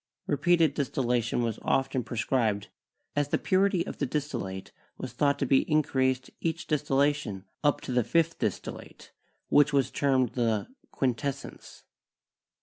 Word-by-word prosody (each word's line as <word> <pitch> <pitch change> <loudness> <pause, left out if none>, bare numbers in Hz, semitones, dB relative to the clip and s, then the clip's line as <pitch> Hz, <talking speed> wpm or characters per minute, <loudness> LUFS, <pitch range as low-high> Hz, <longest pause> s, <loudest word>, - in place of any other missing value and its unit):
Repeated 165 0 +3
distillation 125 -4 0
was 115 -2 -2
often 135 -1 0
prescribed, 115 -4 -1 0.5
as 145 -1 +1
the - - +1
purity 190 -2 +2
of - - -7
the 140 - 0
distillate 120 -10 -4 0.3
was 130 -2 -6
thought 140 +2 +2
to 140 - 0
be 135 0 +4
increased 130 -4 +2
by - - -17
each 165 +1 -2
distillation 145 - 0 0.2
up 145 -1 +2
to - - -6
the 125 -1 +2
fifth 165 +7 +1
distillate, - - -5 0.4
which 145 0 +5
was 135 -2 +2
termed 130 -3 +2
the 115 -3 0 0.2
'"quintessence." 135 +1 -3
135 Hz, 140 wpm, -28 LUFS, 120-145 Hz, 0.5 s, which